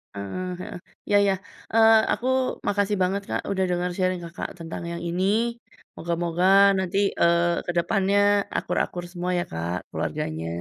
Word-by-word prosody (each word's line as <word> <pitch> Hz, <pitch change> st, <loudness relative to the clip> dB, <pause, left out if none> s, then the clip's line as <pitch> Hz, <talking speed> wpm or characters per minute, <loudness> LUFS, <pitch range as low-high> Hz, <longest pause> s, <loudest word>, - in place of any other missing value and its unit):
Heeh 100 Hz, -, -5 dB
heeh. -, -, -7 dB, 0.3 s
Iya 205 Hz, -, +4 dB
iya, 195 Hz, -1 st, +3 dB, 0.4 s
eee, 225 Hz, 0 st, +7 dB, 0.2 s
aku 250 Hz, -, -3 dB, 0.4 s
makasih 205 Hz, 0 st, +1 dB
banget, 195 Hz, +2 st, 0 dB
Kak, -, -, -1 dB
udah 190 Hz, -1 st, 0 dB
dengar 180 Hz, 0 st, 0 dB
sharing 185 Hz, -1 st, 0 dB
Kakak 170 Hz, -, -6 dB
tentang 165 Hz, +1 st, -6 dB
yang 170 Hz, -, -5 dB
ini, 180 Hz, +2 st, -1 dB, 0.7 s
moga-moga 170 Hz, +1 st, -1 dB, 0.3 s
nanti, 190 Hz, +1 st, -1 dB, 0.2 s
eee, 170 Hz, 0 st, +3 dB
ke 175 Hz, -, -1 dB
depannya 195 Hz, +3 st, +2 dB, 0.4 s
akur-akur 175 Hz, -1 st, -2 dB
semua 180 Hz, 0 st, -3 dB
ya, -, -, 0 dB
Kak, 85 Hz, +2 st, -3 dB
keluarganya. 80 Hz, +1 st, -3 dB
180 Hz, 145 wpm, -25 LUFS, 170-195 Hz, 0.7 s, eee